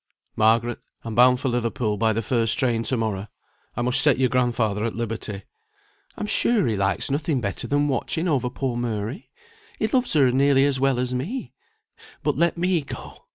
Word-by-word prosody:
"Margaret, 115 Hz, +2 st, +2 dB, 0.2 s
I'm 115 Hz, -, -5 dB
bound 125 Hz, +2 st, +5 dB
for 135 Hz, -, -2 dB
Liverpool 115 Hz, -2 st, -1 dB
by 110 Hz, +2 st, +1 dB
the 115 Hz, +1 st, -2 dB
first 115 Hz, -1 st, +1 dB
train 120 Hz, -3 st, +1 dB
to 125 Hz, +2 st, 0 dB
morrow; 105 Hz, -3 st, -2 dB, 0.5 s
I 120 Hz, -, 0 dB
must 125 Hz, +2 st, +3 dB
set 140 Hz, -1 st, +4 dB
your 130 Hz, -1 st, +2 dB
grandfather 120 Hz, -5 st, 0 dB
at 115 Hz, -, -2 dB
liberty." 110 Hz, -3 st, -4 dB, 0.7 s
"I'm -, -, -3 dB
sure 220 Hz, -, +2 dB
he 115 Hz, -3 st, 0 dB
likes 100 Hz, +5 st, 0 dB
nothing 145 Hz, 0 st, 0 dB
better 100 Hz, -5 st, -3 dB
than 145 Hz, +1 st, +1 dB
watching 155 Hz, +5 st, -1 dB
over 135 Hz, -6 st, +1 dB
poor 130 Hz, -1 st, -3 dB
Mary; 115 Hz, -, -4 dB, 0.5 s
he -, -, 0 dB
loves 250 Hz, +3 st, +1 dB
her 135 Hz, -5 st, +4 dB
nearly 135 Hz, +1 st, +4 dB
as 140 Hz, -2 st, +2 dB
well 135 Hz, -1 st, +2 dB
as 125 Hz, 0 st, -1 dB
me. 180 Hz, -, -4 dB, 0.7 s
But -, -, +1 dB
let 170 Hz, 0 st, +1 dB
me 175 Hz, -1 st, +1 dB
go! 140 Hz, -, -10 dB
125 Hz, 185 wpm, -23 LUFS, 115-140 Hz, 0.7 s, bound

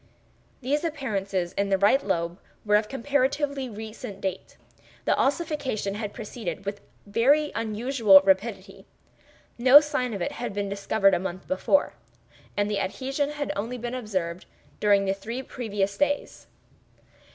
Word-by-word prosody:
These 285 Hz, +5 st, 0 dB
appearances 200 Hz, -, -2 dB
in 200 Hz, 0 st, -1 dB
the 195 Hz, -, +3 dB
right 205 Hz, +8 st, +4 dB
lobe 170 Hz, -2 st, -1 dB, 0.3 s
were 210 Hz, 0 st, +4 dB
of 210 Hz, 0 st, +2 dB
comparatively 275 Hz, 0 st, 0 dB
recent 215 Hz, -2 st, -8 dB
date. 190 Hz, -1 st, -5 dB, 0.5 s
The -, -, +3 dB
ossification 285 Hz, -, -1 dB
had 205 Hz, 0 st, -4 dB
proceeded 205 Hz, -4 st, -6 dB
with 200 Hz, +1 st, -4 dB, 0.2 s
very 265 Hz, +9 st, +3 dB
unusual 225 Hz, -2 st, +4 dB
rapidity; 195 Hz, +3 st, -1 dB, 0.7 s
no 260 Hz, +4 st, +9 dB
sign 285 Hz, -6 st, -2 dB
of 195 Hz, -, -5 dB
it -, -, -2 dB
had 240 Hz, -4 st, -5 dB
been 200 Hz, -1 st, -2 dB
discovered 200 Hz, 0 st, +2 dB
a 175 Hz, -, +2 dB
month 185 Hz, 0 st, -6 dB
before, 285 Hz, +10 st, +2 dB, 0.6 s
and 205 Hz, 0 st, +2 dB
the 210 Hz, -1 st, -1 dB
adhesion 270 Hz, +9 st, -2 dB
had 295 Hz, -1 st, -3 dB
only 230 Hz, +5 st, -3 dB
been 240 Hz, +1 st, -5 dB
observed 185 Hz, -8 st, -3 dB, 0.3 s
during 200 Hz, -1 st, +4 dB
the 195 Hz, -, +1 dB
three 230 Hz, +6 st, -6 dB
previous 205 Hz, -6 st, -2 dB
days. 290 Hz, 0 st, -1 dB
215 Hz, 140 wpm, -26 LUFS, 195-265 Hz, 0.7 s, no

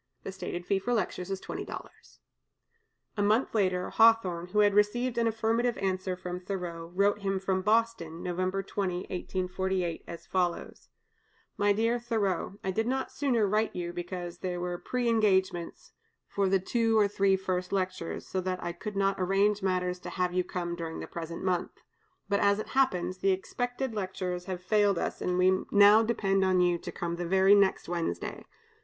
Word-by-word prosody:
The -, -, -5 dB
stated 175 Hz, -2 st, -5 dB
fee 195 Hz, +1 st, +1 dB
for 240 Hz, +5 st, -1 dB
lectures 185 Hz, -3 st, -2 dB
is 195 Hz, -1 st, -2 dB
$20." -, -, -8 dB, 1.0 s
A -, -, +1 dB
month 215 Hz, +5 st, +2 dB
later, 185 Hz, -4 st, +1 dB
Hawthorne, 195 Hz, -7 st, +4 dB
who 210 Hz, +3 st, +2 dB
had 205 Hz, -1 st, +4 dB
received 230 Hz, +5 st, +2 dB
an 230 Hz, -, +2 dB
affirmative 225 Hz, +2 st, 0 dB
answer 185 Hz, -1 st, -1 dB
from 180 Hz, 0 st, -5 dB
Thoreau, 175 Hz, -3 st, -5 dB
wrote 200 Hz, +2 st, +3 dB
to -, -, -16 dB
him 195 Hz, -1 st, -1 dB
from 190 Hz, 0 st, 0 dB
Boston 210 Hz, -6 st, 0 dB
(November 185 Hz, +2 st, -1 dB
20, 185 Hz, -2 st, -2 dB
1848), 185 Hz, -1 st, -2 dB
as 170 Hz, -, -8 dB
follows: 180 Hz, -2 st, -2 dB, 0.7 s
"MY 205 Hz, 0 st, +3 dB
DEAR 230 Hz, +3 st, +1 dB
THOREAU, 205 Hz, -5 st, -1 dB
I 190 Hz, -, -1 dB
did 220 Hz, +4 st, -1 dB
not 265 Hz, +1 st, -1 dB
sooner 250 Hz, -7 st, +1 dB
write 215 Hz, +2 st, 0 dB
you, 175 Hz, -1 st, -4 dB
because 175 Hz, 0 st, -6 dB
there 180 Hz, -1 st, -3 dB
were 175 Hz, 0 st, -4 dB
preëngagements 205 Hz, -8 st, 0 dB, 0.4 s
for 195 Hz, -1 st, 0 dB
the 195 Hz, -, +4 dB
two 225 Hz, +4 st, +1 dB
or 210 Hz, -2 st, +5 dB
three 195 Hz, -1 st, +2 dB
first 185 Hz, -1 st, -2 dB
lectures, 185 Hz, -3 st, -3 dB
so 190 Hz, -, -2 dB
that 185 Hz, 0 st, -2 dB
I 175 Hz, -, -2 dB
could 205 Hz, +4 st, -7 dB
not 195 Hz, 0 st, +1 dB
arrange 195 Hz, +3 st, +2 dB
matters 180 Hz, -1 st, 0 dB
to -, -, -7 dB
have 180 Hz, -1 st, -1 dB
you 180 Hz, 0 st, +2 dB
come 175 Hz, -1 st, -4 dB
during 165 Hz, -1 st, -5 dB
the -, -, -5 dB
present 170 Hz, 0 st, -6 dB
month. 180 Hz, -2 st, -1 dB, 0.5 s
But, 200 Hz, 0 st, +1 dB
as 200 Hz, 0 st, +3 dB
it 215 Hz, -, -5 dB
happens, 185 Hz, -9 st, +1 dB
the 195 Hz, -, +2 dB
expected 245 Hz, +6 st, -3 dB
lectures 185 Hz, -3 st, -3 dB
have 185 Hz, -1 st, -5 dB
failed 205 Hz, -1 st, +3 dB
us, -, -, -3 dB
and 180 Hz, 0 st, 0 dB
we 185 Hz, +1 st, +4 dB
now 205 Hz, +1 st, +7 dB
depend 195 Hz, -4 st, +1 dB
on 185 Hz, -1 st, +3 dB
you 175 Hz, -1 st, +3 dB
to -, -, -7 dB
come 170 Hz, 0 st, -4 dB
the 175 Hz, 0 st, -3 dB
very 190 Hz, +2 st, +5 dB
next 200 Hz, -2 st, +3 dB
Wednesday. 165 Hz, -, -3 dB
190 Hz, 180 wpm, -29 LUFS, 180-210 Hz, 1.0 s, now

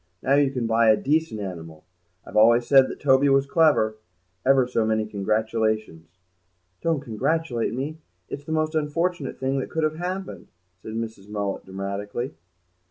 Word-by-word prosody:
Now 135 Hz, -, +2 dB
you 140 Hz, -1 st, +4 dB
can 125 Hz, -3 st, -3 dB
buy 115 Hz, 0 st, +3 dB
a 110 Hz, -, +6 dB
decent 155 Hz, -5 st, 0 dB
animal. 80 Hz, -5 st, -7 dB, 0.4 s
I've -, -, -11 dB
always 115 Hz, +3 st, +5 dB
said 135 Hz, 0 st, +6 dB
that -, -, -7 dB
Toby 140 Hz, 0 st, +4 dB
was 135 Hz, 0 st, +4 dB
clever. 140 Hz, -8 st, +3 dB, 0.5 s
Ever 135 Hz, -1 st, +4 dB
so 120 Hz, -2 st, 0 dB
many 110 Hz, 0 st, +1 dB
congratulations." 110 Hz, -4 st, -2 dB, 0.6 s
"Don't 165 Hz, -4 st, 0 dB
congratulate 125 Hz, 0 st, -1 dB
me. 150 Hz, +5 st, -4 dB, 0.3 s
It's 140 Hz, -, -7 dB
the 160 Hz, -, -6 dB
most 155 Hz, 0 st, 0 dB
unfortunate 155 Hz, 0 st, -1 dB
thing 135 Hz, +1 st, 0 dB
that -, -, -4 dB
could 160 Hz, -, -2 dB
have 155 Hz, 0 st, 0 dB
happened!" 185 Hz, +2 st, -5 dB, 0.3 s
said 110 Hz, -, -8 dB
Mrs. 110 Hz, -3 st, -6 dB
Mullet 100 Hz, -2 st, -3 dB
dramatically. 100 Hz, +5 st, -4 dB
125 Hz, 160 wpm, -24 LUFS, 110-150 Hz, 0.6 s, a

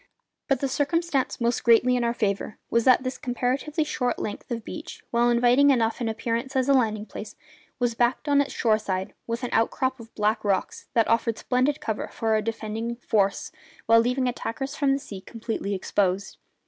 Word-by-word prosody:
But 275 Hz, -2 st, +1 dB
the 275 Hz, -, +1 dB
circumstance 290 Hz, +1 st, 0 dB
most 235 Hz, 0 st, 0 dB
greatly 240 Hz, +2 st, +5 dB
in 245 Hz, -, 0 dB
our 235 Hz, -, +2 dB
favour 200 Hz, -1 st, -1 dB
was 235 Hz, 0 st, +2 dB
that 255 Hz, 0 st, +5 dB
this 255 Hz, 0 st, -4 dB
comparatively 260 Hz, +5 st, -1 dB
short 250 Hz, -5 st, -1 dB
length 210 Hz, -, -5 dB
of 235 Hz, -3 st, -4 dB
beach, -, -, -8 dB
while 240 Hz, 0 st, +3 dB
inviting 245 Hz, +4 st, +5 dB
enough 235 Hz, -2 st, +2 dB
in 230 Hz, -, 0 dB
appearance 235 Hz, +4 st, -3 dB
as 260 Hz, 0 st, +2 dB
a 280 Hz, -, +5 dB
landing 215 Hz, -5 st, +1 dB
place, 215 Hz, -1 st, -8 dB, 0.4 s
was 245 Hz, -1 st, 0 dB
backed, 240 Hz, +5 st, 0 dB
on 285 Hz, -1 st, +4 dB
its 285 Hz, -, -3 dB
shore 215 Hz, -2 st, +2 dB
side, 190 Hz, -2 st, -3 dB
by 230 Hz, -, 0 dB
an 245 Hz, -, -1 dB
outcrop 260 Hz, +3 st, +1 dB
of 230 Hz, 0 st, -12 dB
black 215 Hz, +1 st, +1 dB
rocks 200 Hz, -2 st, -1 dB
that 230 Hz, -2 st, +4 dB
offered 230 Hz, 0 st, +1 dB
splendid 260 Hz, +4 st, +1 dB
cover 220 Hz, -2 st, -3 dB
for 220 Hz, -1 st, 0 dB
a 215 Hz, -, +2 dB
defending 225 Hz, +1 st, -3 dB
force 210 Hz, -4 st, 0 dB, 0.3 s
while 230 Hz, 0 st, +6 dB
leaving 250 Hz, +2 st, +1 dB
attackers 265 Hz, +3 st, -4 dB
from 285 Hz, -3 st, +2 dB
the -, -, +1 dB
sea 200 Hz, -8 st, -8 dB
completely 220 Hz, -2 st, -4 dB
exposed. 190 Hz, 0 st, -1 dB
235 Hz, 190 wpm, -25 LUFS, 220-260 Hz, 0.4 s, while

